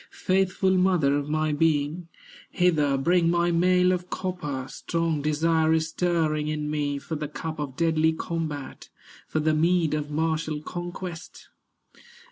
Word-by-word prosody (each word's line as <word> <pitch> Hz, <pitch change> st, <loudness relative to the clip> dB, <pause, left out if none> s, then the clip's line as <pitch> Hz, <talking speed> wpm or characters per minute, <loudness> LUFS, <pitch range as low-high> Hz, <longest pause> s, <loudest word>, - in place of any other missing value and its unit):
Faithful 190 Hz, 0 st, +2 dB
mother 180 Hz, -7 st, +3 dB
of 145 Hz, 0 st, -2 dB
my 155 Hz, 0 st, 0 dB
being, 155 Hz, +2 st, 0 dB, 0.4 s
Hither 155 Hz, -6 st, +2 dB
bring 170 Hz, +4 st, +2 dB
my 175 Hz, 0 st, +2 dB
mail 180 Hz, +1 st, +3 dB
of 180 Hz, 0 st, -2 dB
copper; 155 Hz, -8 st, -4 dB
Strong 165 Hz, -1 st, -2 dB
desire 160 Hz, +2 st, +2 dB
is 160 Hz, 0 st, +1 dB
stirring 160 Hz, -3 st, 0 dB
in 150 Hz, -1 st, -2 dB
me 145 Hz, -2 st, -1 dB
For 150 Hz, -, -7 dB
the 150 Hz, -1 st, -3 dB
cup 155 Hz, +2 st, -6 dB
of 140 Hz, -3 st, -4 dB
deadly 160 Hz, -1 st, +2 dB
combat, 160 Hz, -4 st, -5 dB, 0.4 s
For 155 Hz, -, -1 dB
the 155 Hz, 0 st, +2 dB
mead 165 Hz, +1 st, +2 dB
of 150 Hz, -1 st, -2 dB
martial 155 Hz, 0 st, -1 dB
conquest." 175 Hz, 0 st, -7 dB
160 Hz, 140 wpm, -26 LUFS, 150-175 Hz, 0.4 s, mother